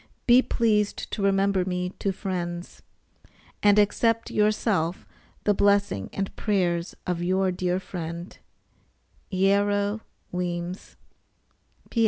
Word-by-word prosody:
Be 245 +1 +7
pleased 215 -5 0
to - - -3
remember 195 -1 +2
me 180 0 -2
to 195 - 0
friends, 175 -2 -5 0.8
and 205 0 +5
accept 230 +2 +2
yourself 210 -5 +1 0.4
the 205 - +3
blessing 200 - +2
and 195 -1 -4
prayers 180 -4 0
of 180 -2 -1
your 185 +1 +1
dear 180 0 -1
friend, 170 -1 -6 1.0
EARRO 200 +2 +2 0.3
WEEMS. 180 0 -4
195 Hz, 100 wpm, -26 LUFS, 180-205 Hz, 1.0 s, Be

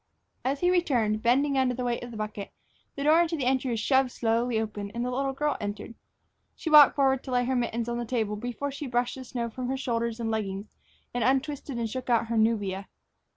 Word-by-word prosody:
As 275 +2 -1
he 355 0 +4
returned, 240 -12 +1
bending 270 +4 +3
under 255 -1 +2
the 250 - -3
weight 240 -1 -1
of 245 - -7
the 230 - -8
bucket, 215 -1 -5 0.4
the 280 - -3
door 315 +3 +5
into 335 -1 0
the 270 - -2
entry 260 0 +1
was 230 -2 -1
shoved 265 +3 +2
slowly 230 0 0
open 210 -2 -4
and 240 +1 -1
the 250 - -2
little 270 +2 -1
girl 295 +2 -1
entered. 205 +2 -5 0.6
She 320 - -4
walked 300 -2 +9
forward 270 -2 +2
to - - -9
lay 245 0 +2
her 260 +1 0
mittens 235 -1 -1
on 240 0 -2
the 240 - -3
table 220 -3 -1
before 245 +6 -4
she 280 +1 -6
brushed 245 0 0
the 260 - -8
snow 240 -1 -3
from 255 +2 -4
her 265 +1 -1
shoulders 235 -3 -2
and 225 -1 -2
leggings 205 -1 -4 0.4
and 245 - 0
untwisted 270 0 0
and 230 -1 -1
shook 255 +3 -6
out 230 -1 +2
her 230 - 0
nubia. 205 -4 0
245 Hz, 230 wpm, -27 LUFS, 225-270 Hz, 0.6 s, walked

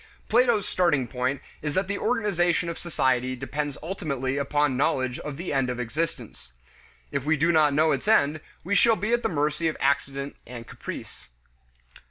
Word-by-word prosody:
Plato's 230 -3 +3
starting 165 -11 +2
point 130 +3 -2 0.2
is 150 -1 -3
that 190 0 +1
the 200 +1 -2
organization 175 -7 +1
of 170 - -5
society 130 -6 0
depends 145 +2 -4
ultimately 140 -7 -2
upon 145 0 +1
knowledge 130 -2 0
of 145 -2 -6
the 175 0 -4
end 135 -2 +1
of 125 0 -3
existence. 125 - -4 0.6
If 140 -2 -2
we 155 +2 +2
do 165 +3 +3
not 155 -3 +4
know 155 +1 +4
its - - -2
end, 155 -8 +3 0.2
we 195 - -2
shall 225 +4 +5
be 215 +4 -1
at 240 - +3
the - - 0
mercy 150 +1 0
of 155 - -2
accident 140 0 0
and 120 -2 -8
caprice. - - -8
150 Hz, 175 wpm, -26 LUFS, 135-175 Hz, 0.6 s, shall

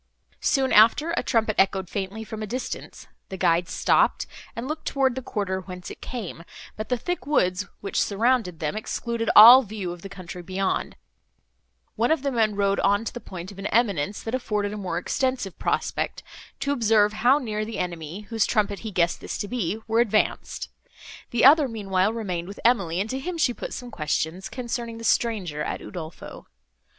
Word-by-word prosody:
Soon 265 -1 +1
after, 230 +10 +6
a - - +1
trumpet 220 -3 +1
echoed 190 -1 +2
faintly 200 +4 -4
from 220 0 -7
a 215 - -4
distance; 250 +5 -6 0.2
the 190 - -6
guides 170 0 +2
stopped, - - +2 0.3
and 235 +3 -4
looked 310 +2 -5
toward 270 -2 +2
the 260 - -4
quarter 200 -6 -2
whence 180 -1 -8
it - - -11
came, 210 -9 -6 0.3
but 215 - -6
the 250 - +1
thick 350 0 -4
woods, 195 -9 +1
which 200 - -1
surrounded 215 -5 +1
them, 150 +3 -2
excluding 230 +1 -3
all 235 +5 +11
view 205 -6 -5
of 175 -1 -9
the 195 - -8
country 180 -2 -8
beyond, 190 +2 -2 1.0
one 230 +2 +1
of 320 -4 +1
the 280 - 0
men 220 -4 +1
rode 200 -1 +1
on 205 +3 +2
to - - -4
the 240 - -6
point 185 -4 -8
of 195 - -12
an 195 - -3
eminence, 200 -5 0
that 225 - -5
afforded 210 -5 -1
a - - -4
more 185 -5 -3
extensive 255 +1 -2
prospect, - - -1 0.4
to 280 - -1
observe 220 -5 +3
how 240 +6 +4
near 215 -6 -3
the 225 +1 -5
enemy, 170 +1 -4
whose 220 0 0
trumpet 205 -3 0
he 220 - -6
guessed 175 -3 0
this - - -5
to 205 - -4
be, 215 -4 -2
were 225 +1 +2
advanced; 220 -3 0 0.6
the 240 0 +2
other, 290 +1 +7
meanwhile, 200 -4 0
remained 185 -7 -4
with 200 - -9
Emily, 195 -8 +2
and 200 - 0
to 265 - -2
him 350 +5 -4
she 285 -6 +2
put - - -7
some 245 -1 -7
questions, 160 +2 -2
concerning 235 -2 -4
the 230 - -9
stranger 205 -10 0
at - - -3
Udolpho. 165 -4 -9
215 Hz, 190 wpm, -25 LUFS, 190-240 Hz, 1.0 s, all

